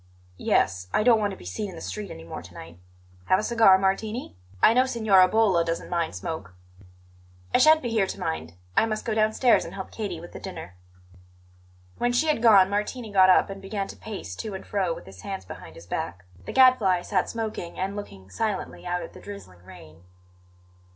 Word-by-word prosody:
"Yes; 90 +1 +1
I - - +3
don't 230 -1 +5
want 205 -1 0
to 195 - -7
be - - -14
seen 195 - -4
in 185 - -10
the - - -8
street 210 -2 -5
any 80 - -9
more 85 - -7
to 90 +1 -14
night. 85 +1 -11 0.5
Have 185 - +4
a - - -2
cigar, 220 -5 +5
Martini? 205 - -2 0.2
I 220 - +6
know 255 +2 +3
Signora 215 -7 +4
Bolla 195 -5 +3
doesn't 165 0 -4
mind 170 -2 -1
smoke." 160 - -6 1.0
"I - - +5
shan't 310 -1 +6
be 240 - -2
here 215 -4 +2
to - - -6
mind; 80 +1 -4 0.2
I 225 - +4
must 215 -1 -3
go 225 - -1
downstairs 220 +3 +3
and - - -9
help 190 -1 -7
Katie 200 -7 -5
with 175 +1 -11
the - - -9
dinner." 185 - -8 1.3
When 245 - +1
she 245 +6 +2
had 295 -7 +1
gone 205 -5 +7
Martini 210 +3 -3
got 190 -2 +6
up 185 - +4
and 195 0 -8
began 195 0 -4
to - - -8
pace 195 - -7
to 210 - -5
and 190 - -8
fro 195 -4 -1
with - - -6
his 95 -1 -13
hands 95 -1 -6
behind 90 -3 -10
his 85 - -12
back. 90 +1 -5 0.2
The - - -5
Gadfly 230 -9 +4
sat 185 -2 0
smoking 220 -6 -5
and 195 +2 -2
looking 95 - -9
silently 210 - -3
out 175 0 -2
at - - -10
the - - -13
drizzling 145 - -11
rain. 85 -4 -14
195 Hz, 210 wpm, -25 LUFS, -, 1.3 s, gone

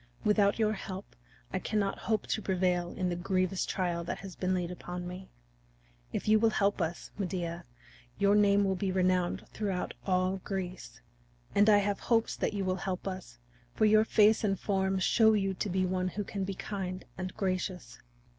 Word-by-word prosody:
Without 205 -1 +3
your 215 -1 +2
help 190 -1 -7 0.4
I - - 0
cannot 205 -2 -1
hope 215 -2 +1
to 220 - -1
prevail 180 -2 +1
in 185 -1 -1
the 175 - -1
grievous 185 +1 0
trial 175 -2 -1
that - - -3
has 190 -2 -9
been 185 0 -1
laid 180 -1 -2
upon 180 0 -6
me. 180 +1 -8 0.8
If - - -3
you 215 0 +6
will 225 +1 +4
help 200 -2 +1
us, 170 +1 -3
Medea, 175 -3 -3 0.5
your 200 0 +4
name 205 -1 +5
will 195 -1 +2
be 190 +1 -1
renowned 185 -1 +1
throughout 195 -4 -2
all 185 0 +1
Greece. 185 - -5 0.5
And 205 +2 +5
I 210 - +7
have 205 0 0
hopes 230 -2 +1
that - - -1
you 195 -1 -1
will 185 0 0
help 185 0 -4
us, 185 -11 -6 0.4
for 215 - +3
your 215 0 +6
face 220 0 +4
and 195 -3 +1
form 190 -1 0
show 220 +4 +4
you 195 -2 +1
to 200 - -3
be 185 +1 +1
one 185 0 0
who 205 +3 -3
can 195 -1 -3
be 195 0 -4
kind 185 -2 -5
and 185 0 -4
gracious." 185 - -2
190 Hz, 185 wpm, -31 LUFS, 180-205 Hz, 0.8 s, I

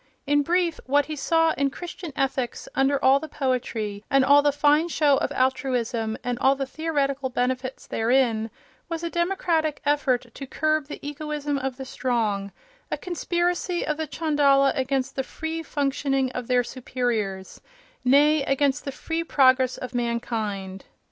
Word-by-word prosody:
In 290 +1 +3
brief, 340 +2 +1
what 285 +2 +3
he 310 - -5
saw 325 +3 +2
in 280 -2 0
Christian 345 +2 -8
ethics, 265 -2 -2
under 270 +1 +2
all 270 +1 +6
the 315 - -7
poetry 235 -7 -2
and 275 -1 +4
all 285 +1 +7
the 290 0 +3
fine 295 +3 +3
show 295 -4 +3
of - - -1
altruism 245 -4 0
and 245 0 -2
all 270 +1 +4
the 270 0 -2
theoretical 280 -2 -1
benefits 255 +1 -2
therein, 230 -1 +1 0.4
was 330 0 -4
a 335 - -3
democratic 340 -4 0
effort 255 -5 +1
to 275 - -8
curb 310 +1 0
the 295 - -6
egoism 295 -1 -3
of 265 -1 -3
the 265 - -6
strong—a 240 - -3
conspiracy 350 0 -1
of 305 - -1
the 315 -1 -3
chandala 285 -3 +3
against 265 -1 -1
the 270 - 0
free 320 +4 -5
functioning 275 -3 -1
of 250 -2 -5
their 250 -1 +3
superiors, 235 -6 -3 0.4
nay, 290 +4 +5
against 275 +1 +1
the 275 - -3
free 325 +4 -3
progress 260 -4 +3
of 255 0 -7
mankind. 220 -5 -3
275 Hz, 155 wpm, -25 LUFS, 250-305 Hz, 0.4 s, all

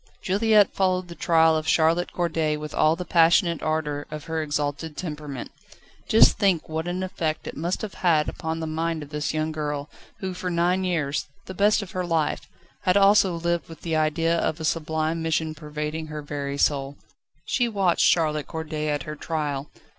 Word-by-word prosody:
Juliette 210 +1 +3
followed 185 -2 0
the - - -7
trial 160 -2 +3
of 155 0 -2
Charlotte 165 +2 +2
Corday 160 -3 0
with 150 0 -7
all 155 +1 +3
the 180 +1 -6
passionate 170 0 +4
ardour 150 -2 -2
of 150 -1 -6
her 160 -1 -2
exalted 150 +1 -3
temperament. 150 -6 -6 0.6
Just 220 -1 +6
think 195 -6 +2
what 160 +1 -3
an 180 +1 -2
effect 160 -4 -3
it - - -6
must 175 +7 -2
have 210 - -5
had 160 -4 +2
upon 160 0 -4
the 160 - -3
mind 160 0 -2
of 145 - -12
this 150 -1 -2
young 155 0 -1
girl, 150 -1 -4 0.3
who 190 -1 -4
for 180 0 -4
nine 175 +2 +1
years 150 -5 -1 0.2
the 190 - -7
best 205 +2 +3
of 190 - -10
her 185 - -2
life 165 -4 -1 0.3
had 185 +2 +3
also 195 -2 +5
lived 170 0 -1
with 165 -2 -11
the 165 -2 -2
idea 155 +2 +1
of 160 - -1
a 160 - -3
sublime 160 +1 -1
mission 160 -1 0
pervading 150 +1 -5
her 150 -1 -6
very 140 -1 -4
soul. 140 -1 0 0.5
She 245 - +1
watched 195 -5 +1
Charlotte 155 -3 +1
Corday 155 -1 -4
at 145 -1 -1
her 150 - -6
trial. 150 -3 -3
160 Hz, 185 wpm, -25 LUFS, 150-175 Hz, 0.6 s, Just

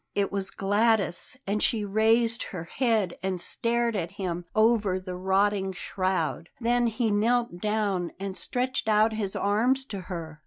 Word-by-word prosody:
It 200 -1 +1
was 195 -1 -1
Gladys; 205 +1 +1
and 205 +2 -1
she 215 -3 +1
raised 225 +3 +2
her 180 -4 -5
head 215 -2 0
and 190 -1 -2
stared 235 +4 +1
at 170 -3 -3
him 180 -3 -4
over 215 -4 +3
the 185 -1 -6
rotting 190 +1 +1
shroud. 185 -3 -2
Then 240 0 +2
he 225 0 0
knelt 230 -2 +1
down 205 -4 -1
and 195 -1 -4
stretched 255 +1 -2
out 215 +1 +4
his 205 -3 -3
arms 240 +7 +1
to 205 -6 -6
her. 165 -4 -7
205 Hz, 155 wpm, -27 LUFS, 190-225 Hz, -, out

